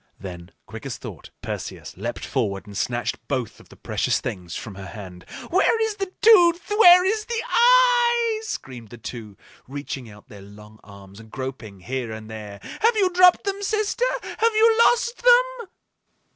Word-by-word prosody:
Then, 90 -2 -9 0.2
quick - - -9
as - - -5
thought, - - -10
Perseus - - -7
leaped - - -5
forward 100 -6 -2
and 100 -1 -12
snatched 120 +3 -2
both 125 -6 -3
of - - -19
the - - -15
precious - - -1
things 90 -3 -6
from 105 - -7
her 95 0 -9
hand. 90 -1 -10 0.3
"Where 390 +5 +3
is 440 -2 -2
the 390 -2 -4
tooth? 355 -4 +5
Where 360 -4 +7
is 425 +2 0
the 470 -1 -3
eye?" 475 -2 +3
screamed 125 - -7
the 120 - -11
two, 110 -4 -9 0.3
reaching 135 -3 -7
out 105 +3 -16
their 105 -6 -13
long 105 +2 -15
arms 100 0 -14
and 110 0 -14
groping 120 -7 -7
here 125 +1 -4
and 110 0 -9
there. 105 -2 -9 0.2
"Have 460 +1 +3
you 385 -4 +2
dropped 360 0 +5
them, 395 0 -3
sister? 430 +4 -1 0.2
Have 455 0 -1
you 445 +1 +5
lost 480 0 +1
them?" - - +3
135 Hz, 170 wpm, -23 LUFS, -, 0.3 s, Where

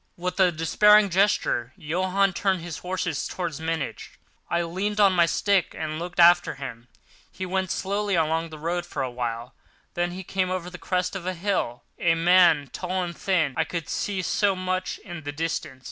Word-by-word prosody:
With 180 +1 -4
a 185 -2 +5
despairing 205 +5 +4
gesture, 175 - +1
Johann 185 +5 +1
turned 190 -1 0
his 170 -2 -6
horses 180 -4 -2
towards 170 -5 -4
Munich. 160 -3 -4 0.3
I 170 0 +1
leaned 195 +5 -2
on 200 -2 +6
my 170 -2 +4
stick 190 +3 +1
and 155 0 -3
looked 175 +1 -6
after 175 +1 +6
him. 125 -3 -8 0.4
He 185 - -5
went 185 0 -1
slowly 200 +1 -1
along 165 0 +1
the 155 - -9
road 170 +3 -2
for 150 -5 -4
a 130 - -3
while: 120 -1 -4 0.4
then 175 0 0
there 190 - -6
came 185 0 -1
over 180 -1 -3
the 180 - -9
crest 180 0 -1
of 195 - -3
the 185 +1 -3
hill 170 -10 -2 0.2
a 165 -1 +3
man 170 -4 +4
tall 185 0 -2
and 170 -1 -5
thin. 170 -8 +1
I - - +2
could 170 -4 -5
see 195 -2 -2
so 200 +2 +1
much 185 0 -2
in 175 -4 -7
the 145 -1 -5
distance. 145 -3 -3
175 Hz, 190 wpm, -25 LUFS, 160-185 Hz, 0.4 s, on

